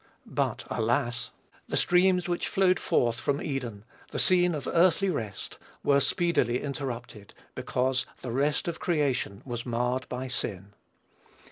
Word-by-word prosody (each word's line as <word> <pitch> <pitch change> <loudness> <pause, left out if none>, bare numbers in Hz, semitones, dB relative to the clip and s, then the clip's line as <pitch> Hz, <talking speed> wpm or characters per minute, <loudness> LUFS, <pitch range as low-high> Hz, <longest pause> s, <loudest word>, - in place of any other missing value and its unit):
But, - - -2
alas! 120 0 0 0.4
the - - 0
streams 180 0 +4
which 175 -1 -1
flowed 185 -2 +3
forth 120 -1 +1
from 140 0 0
Eden 120 -8 -4 0.2
the - - -5
scene 180 -2 +5
of 145 - -5
earthly 185 +2 +3
rest 110 - -5 0.2
were 140 -1 +4
speedily 140 -7 +1
interrupted, 120 -7 -6 0.2
because 130 0 0 0.2
the 125 - -4
rest 145 +6 0
of 170 - -3
creation 140 - 0
was 120 -2 -4
marred 125 +1 -1
by 125 +1 -4
sin. 100 -5 -3
130 Hz, 135 wpm, -28 LUFS, 120-170 Hz, 0.4 s, scene